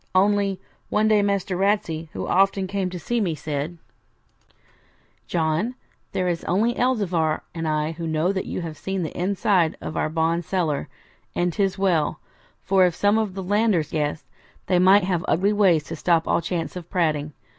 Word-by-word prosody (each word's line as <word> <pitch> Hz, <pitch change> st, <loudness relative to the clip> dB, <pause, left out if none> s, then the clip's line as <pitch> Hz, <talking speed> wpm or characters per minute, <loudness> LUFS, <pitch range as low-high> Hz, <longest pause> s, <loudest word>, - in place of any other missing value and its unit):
Only, 200 Hz, 0 st, +2 dB, 0.3 s
one 215 Hz, +1 st, +2 dB
day 215 Hz, -1 st, +4 dB
Master 200 Hz, -2 st, 0 dB
Ratsey, 180 Hz, -5 st, 0 dB
who -, -, -4 dB
often 195 Hz, +1 st, +2 dB
came 190 Hz, -1 st, -2 dB
to 180 Hz, -, -6 dB
see 235 Hz, +8 st, -1 dB
me, 175 Hz, -6 st, 0 dB
said 150 Hz, +3 st, -4 dB, 1.5 s
'John, 165 Hz, +9 st, 0 dB, 0.4 s
there 185 Hz, -, -1 dB
is 170 Hz, -2 st, -1 dB
only 220 Hz, +6 st, +2 dB
Elzevir 185 Hz, -11 st, +1 dB
and 165 Hz, -2 st, -3 dB
I 155 Hz, 0 st, 0 dB
who 165 Hz, 0 st, -5 dB
know 160 Hz, +3 st, +1 dB
that 190 Hz, -1 st, -3 dB
you -, -, -3 dB
have 160 Hz, -3 st, -7 dB
seen 190 Hz, +2 st, -2 dB
the 155 Hz, -, -5 dB
inside 185 Hz, -2 st, +1 dB
of -, -, -6 dB
our -, -, 0 dB
bond 165 Hz, +2 st, 0 dB
cellar; 160 Hz, -, -1 dB, 0.5 s
and 175 Hz, -1 st, 0 dB
'tis 195 Hz, +1 st, 0 dB
well, 180 Hz, -6 st, +1 dB, 0.4 s
for 190 Hz, -1 st, +4 dB
if 175 Hz, -, -3 dB
some 205 Hz, +2 st, +3 dB
of 210 Hz, -4 st, -2 dB
the 190 Hz, -, -4 dB
landers 205 Hz, -4 st, +1 dB
guessed, 150 Hz, -1 st, -2 dB, 0.4 s
they 180 Hz, -2 st, +2 dB
might 190 Hz, +2 st, +6 dB
have 180 Hz, -2 st, 0 dB
ugly 195 Hz, +5 st, +2 dB
ways 185 Hz, -7 st, +4 dB
to 165 Hz, -, -6 dB
stop 165 Hz, +1 st, +1 dB
all -, -, +2 dB
chance 170 Hz, 0 st, -3 dB
of 175 Hz, -2 st, -8 dB
prating. 150 Hz, -5 st, 0 dB
180 Hz, 175 wpm, -23 LUFS, 160-195 Hz, 1.5 s, might